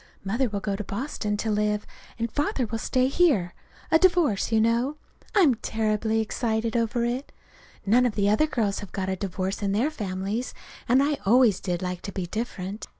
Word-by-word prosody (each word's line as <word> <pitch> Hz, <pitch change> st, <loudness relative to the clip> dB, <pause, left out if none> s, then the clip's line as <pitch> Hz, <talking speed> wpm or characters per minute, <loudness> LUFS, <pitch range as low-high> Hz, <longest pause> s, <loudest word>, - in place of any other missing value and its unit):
Mother 230 Hz, +6 st, 0 dB
will 200 Hz, -1 st, -3 dB
go 200 Hz, -1 st, -1 dB
to 210 Hz, -, -4 dB
Boston 210 Hz, -1 st, -3 dB
to 220 Hz, +1 st, -1 dB
live, 210 Hz, 0 st, 0 dB, 0.3 s
and 230 Hz, -1 st, -2 dB
Father 290 Hz, -3 st, 0 dB
will 225 Hz, 0 st, -4 dB
stay 255 Hz, +3 st, +1 dB
here 265 Hz, -, +2 dB, 0.4 s
a 320 Hz, -, +6 dB
divorce, 340 Hz, -, +3 dB
you 220 Hz, -, +4 dB
know. 235 Hz, +6 st, +2 dB, 0.4 s
I'm 345 Hz, -10 st, +6 dB
terribly 220 Hz, -1 st, 0 dB
excited 220 Hz, 0 st, -1 dB
over 235 Hz, 0 st, +1 dB
it. 250 Hz, +4 st, -3 dB, 0.5 s
None 245 Hz, +5 st, +4 dB
of 225 Hz, -, -4 dB
the 200 Hz, -1 st, +2 dB
other 215 Hz, +10 st, +3 dB
girls 215 Hz, -8 st, -1 dB
have 205 Hz, -, -9 dB
got 190 Hz, -1 st, -2 dB
a 190 Hz, -, 0 dB
divorce 190 Hz, +1 st, -3 dB
in 200 Hz, -1 st, 0 dB
their 245 Hz, +9 st, +1 dB
families, 205 Hz, -1 st, -3 dB, 0.3 s
and 260 Hz, +3 st, +5 dB
I 290 Hz, 0 st, 0 dB
always 230 Hz, -2 st, +4 dB
did 180 Hz, -2 st, -3 dB
like 180 Hz, -1 st, -3 dB
to 200 Hz, -, -6 dB
be 190 Hz, -3 st, -3 dB
different. 205 Hz, 0 st, -5 dB
220 Hz, 190 wpm, -26 LUFS, 200-250 Hz, 0.5 s, a